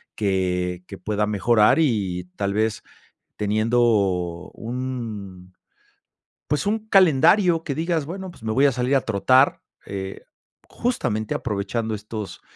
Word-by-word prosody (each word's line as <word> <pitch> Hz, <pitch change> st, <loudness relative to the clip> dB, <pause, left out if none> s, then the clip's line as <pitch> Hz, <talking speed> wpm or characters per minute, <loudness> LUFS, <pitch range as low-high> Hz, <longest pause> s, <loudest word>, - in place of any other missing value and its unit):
que 90 Hz, -3 st, -1 dB
que 100 Hz, -, -9 dB
pueda 105 Hz, +3 st, -1 dB
mejorar 105 Hz, +4 st, +3 dB
y 100 Hz, -, 0 dB
tal 100 Hz, 0 st, -1 dB
vez 110 Hz, 0 st, 0 dB, 0.5 s
teniendo 110 Hz, +3 st, +1 dB, 0.7 s
un 110 Hz, -7 st, -6 dB, 0.9 s
pues, 150 Hz, +5 st, 0 dB
un 215 Hz, +1 st, -1 dB
calendario 180 Hz, -1 st, +5 dB
que 145 Hz, -, -3 dB
digas, 165 Hz, -1 st, -1 dB
bueno, 190 Hz, +3 st, -6 dB
pues, 115 Hz, -, -18 dB
me 110 Hz, -, -2 dB
voy 135 Hz, +5 st, +4 dB
a -, -, +3 dB
salir 125 Hz, +2 st, 0 dB
a 135 Hz, -, +3 dB
trotar, 130 Hz, +5 st, +3 dB, 0.3 s
eh, 95 Hz, -1 st, -6 dB, 0.5 s
justamente 120 Hz, -, -2 dB
aprovechando 110 Hz, +1 st, -2 dB
estos 105 Hz, -1 st, -7 dB
110 Hz, 125 wpm, -23 LUFS, 100-140 Hz, 0.9 s, calendario